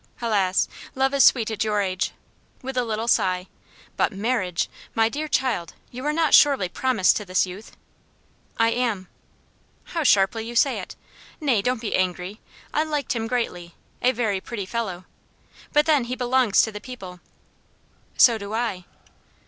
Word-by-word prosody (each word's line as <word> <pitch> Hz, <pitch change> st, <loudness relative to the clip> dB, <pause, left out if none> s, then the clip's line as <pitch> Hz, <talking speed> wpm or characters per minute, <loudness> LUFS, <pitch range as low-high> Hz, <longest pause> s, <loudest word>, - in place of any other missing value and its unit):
Helas! 200 Hz, -5 st, +1 dB, 0.3 s
love 265 Hz, +1 st, +1 dB
is 280 Hz, -, +5 dB
sweet 225 Hz, -3 st, +4 dB
at 220 Hz, -, -1 dB
your 210 Hz, -1 st, 0 dB
age!" 185 Hz, -2 st, -1 dB, 0.5 s
with 265 Hz, 0 st, -5 dB
a 250 Hz, -, +1 dB
little 225 Hz, 0 st, -3 dB
sigh 185 Hz, -5 st, +2 dB, 0.5 s
"but -, -, +2 dB
marriage! 195 Hz, -4 st, -1 dB, 0.3 s
My 225 Hz, 0 st, +3 dB
dear 305 Hz, +5 st, -4 dB
child, 255 Hz, -, -1 dB, 0.2 s
you 250 Hz, +1 st, -7 dB
are -, -, +2 dB
not 320 Hz, -1 st, +1 dB
surely 275 Hz, -10 st, +6 dB
promised 225 Hz, 0 st, +2 dB
to 210 Hz, -, -4 dB
this 185 Hz, -1 st, +1 dB
youth?" 185 Hz, +4 st, -10 dB, 0.8 s
"I 225 Hz, 0 st, +4 dB
am." 230 Hz, -7 st, -1 dB, 0.7 s
"How 335 Hz, -, -4 dB
sharply 220 Hz, -4 st, +3 dB
you 235 Hz, +1 st, -7 dB
say 270 Hz, +3 st, +3 dB
it! -, -, -8 dB, 0.4 s
Nay, 265 Hz, -9 st, +2 dB
don't 250 Hz, +1 st, -1 dB
be 225 Hz, -, -3 dB
angry. 185 Hz, +2 st, -2 dB, 0.3 s
I 305 Hz, -, +2 dB
liked 295 Hz, -5 st, -2 dB
him 225 Hz, -1 st, -2 dB
greatly. 180 Hz, -8 st, -3 dB, 0.3 s
A 250 Hz, -, +4 dB
very 220 Hz, -6 st, -1 dB
pretty 210 Hz, -3 st, -5 dB
fellow. 190 Hz, -4 st, -4 dB, 0.7 s
But 295 Hz, +1 st, +4 dB
then 295 Hz, -6 st, +3 dB
he 250 Hz, +1 st, -3 dB
belongs 250 Hz, -4 st, +3 dB
to 220 Hz, -, -2 dB
the 210 Hz, 0 st, -8 dB
people." 190 Hz, -8 st, -9 dB, 1.0 s
"So 230 Hz, -3 st, +6 dB
do 200 Hz, +1 st, -5 dB
I." 220 Hz, -6 st, -2 dB
225 Hz, 165 wpm, -24 LUFS, 195-255 Hz, 1.0 s, surely